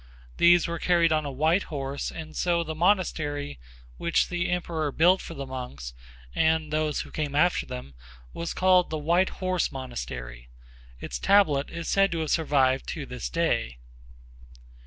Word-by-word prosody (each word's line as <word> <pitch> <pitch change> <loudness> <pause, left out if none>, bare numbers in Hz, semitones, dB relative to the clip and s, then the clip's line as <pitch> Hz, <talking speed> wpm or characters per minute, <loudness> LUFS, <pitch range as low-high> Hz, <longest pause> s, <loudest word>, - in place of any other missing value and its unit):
These 175 0 +5
were 170 0 -4
carried 170 -1 +3
on 155 -1 +1
a 140 - -3
white 160 +8 +2
horse 140 -2 -4
and 160 -1 -8
so 170 -1 +1
the 160 -1 -5
monastery 155 - 0 0.4
which 170 - +1
the 175 -1 -1
emperor 170 -4 -2
built 180 +6 +4
for 165 - -8
the 140 -1 -5
monks 125 - -7 0.4
and 160 -1 +1
those 155 -1 0
who - - -10
came 145 -2 -3
after 175 +4 +2
them 65 +2 -7 0.4
was 170 - -4
called 185 -1 +4
the 155 - -2
White 170 +5 +2
Horse 185 -2 -1
Monastery. - - -7 0.5
Its - - -5
tablet 155 -9 +3
is 170 0 -6
said 195 0 +3
to 165 - -2
have 155 - -2
survived 135 -5 +2
to 150 -5 -4
this 125 -1 -6
day. 115 - 0
155 Hz, 160 wpm, -26 LUFS, 135-170 Hz, 0.5 s, These